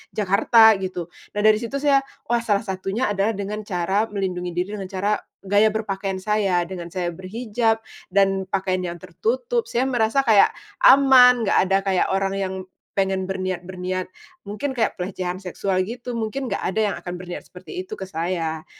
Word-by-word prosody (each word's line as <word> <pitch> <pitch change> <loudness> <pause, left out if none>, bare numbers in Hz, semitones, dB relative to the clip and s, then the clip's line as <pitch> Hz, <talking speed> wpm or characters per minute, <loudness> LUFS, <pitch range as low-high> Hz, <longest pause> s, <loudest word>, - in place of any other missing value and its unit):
Jakarta 220 +3 +5
gitu. 180 -2 -5 0.2
Nah, 210 - 0
dari 215 0 +5
situ 235 +3 -5
saya, 280 -1 +5 0.3
wah 240 - +3
salah 210 -3 0
satunya 195 +3 -2
adalah 205 +2 0
dengan 205 +2 -4
cara 190 +4 0
melindungi 185 -4 -3
diri 180 +2 -1
dengan 190 - -5
cara 200 +2 -1 0.3
gaya 205 +2 +5
berpakaian 195 -3 -3
saya. 200 -4 +1
Dengan 175 -2 -6
saya 180 -1 -2
berhijab 225 +4 -1 0.3
dan 195 0 +2
pakaian 185 -1 -1
yang 175 -1 -4
tertutup, 465 - -1
saya 240 +2 +1
merasa 240 0 +1
kayak 215 -3 +6 0.4
aman, 250 -3 +7
enggak - - +2
ada, 195 0 +3
kayak 190 -2 +2
orang 195 0 0
yang 190 -1 -2 0.4
pengen 190 -1 0
berniat 185 -2 -2
berniat 185 0 -4 0.3
mungkin 265 +7 -4
kayak 230 -4 0
pelecehan 180 0 -3
seksual 185 0 -2
gitu, 240 +2 -6
mungkin 235 +3 -3
enggak 200 - -3
ada 200 +4 -1
yang - - -3
akan 175 - -6
berniat 180 -1 -7
seperti 370 -2 -8
itu 430 - -9
ke 190 - -7
saya. 165 -2 -3
195 Hz, 170 wpm, -23 LUFS, 185-225 Hz, 0.4 s, aman